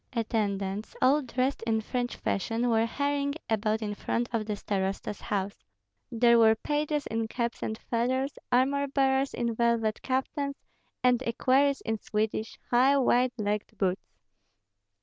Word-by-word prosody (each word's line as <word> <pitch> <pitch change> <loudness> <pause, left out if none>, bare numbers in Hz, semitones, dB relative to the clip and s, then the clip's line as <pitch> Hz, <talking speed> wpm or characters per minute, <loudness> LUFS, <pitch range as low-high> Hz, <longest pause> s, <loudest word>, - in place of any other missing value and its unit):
Attendants, 205 -3 -2
all 280 +4 +4
dressed 255 +1 -1
in 220 -1 +2
French 245 +2 -3
fashion, 225 +5 -1
were 225 0 +3
hurrying 285 +2 -1 0.2
about 220 0 +1
in 205 -1 -2
front 235 +3 -2
of 220 -2 -1
the 210 - -1
starosta's 195 0 -3
house; 200 -1 -3 0.5
there 235 0 +5
were 220 -1 +6
pages 295 +4 -1
in 225 0 -2
caps 235 +1 -3
and 220 - -3
feathers, 260 +5 -1
armor 275 +3 +2
bearers 270 0 +1
in 235 -1 -1
velvet 230 -2 +1
kaftans, 280 +2 -2 0.5
and 250 -1 +4
equerries 265 +3 +2
in 225 -1 -2
Swedish, 215 +1 -2
high, 260 +3 +5
wide 250 -1 +3
legged 210 0 -2
boots. 190 -1 -1
235 Hz, 140 wpm, -28 LUFS, 220-265 Hz, 0.5 s, were